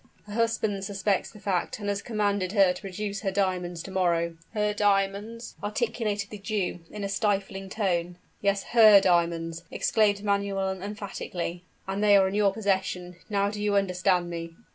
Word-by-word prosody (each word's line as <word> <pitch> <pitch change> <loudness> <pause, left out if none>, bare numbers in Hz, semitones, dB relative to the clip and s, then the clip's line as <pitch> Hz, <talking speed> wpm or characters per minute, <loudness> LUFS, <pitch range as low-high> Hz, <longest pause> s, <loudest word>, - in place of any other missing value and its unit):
"Her 205 - -9
husband 220 -3 0
suspects 195 0 0
the 210 - -14
fact, 195 -4 -1
and 205 -1 -6
has 200 -1 -1
commanded 205 -4 -1
her 195 -4 +5
to - - -10
produce 200 +1 -4
her 195 - 0
diamonds 180 -3 -1
to 195 - -8
morrow 170 -3 +1
" - - -36
"Her 210 0 +1
diamonds!" 205 +3 0
articulated 210 -1 -2
the 210 - -7
Jew 200 -3 -2
in 210 -1 -6
a - - -1
stifling 195 -1 -1
tone. 180 -4 -1 0.2
"Yes, 200 -1 +1
her 215 -4 +9
diamonds," 170 -2 +1
exclaimed 205 -2 +2
Manuel 195 -2 0
emphatically; 190 -3 -5 0.2
"and 195 +2 -2
they 205 -1 +7
are 190 -1 +4
in 190 - -3
your 205 -1 +3
possession. 190 -4 -1
Now 200 -1 +1
do 210 0 -5
you 205 -1 +1
understand 185 -2 +2
me?" 165 -1 -6
200 Hz, 170 wpm, -27 LUFS, 185-210 Hz, 0.2 s, her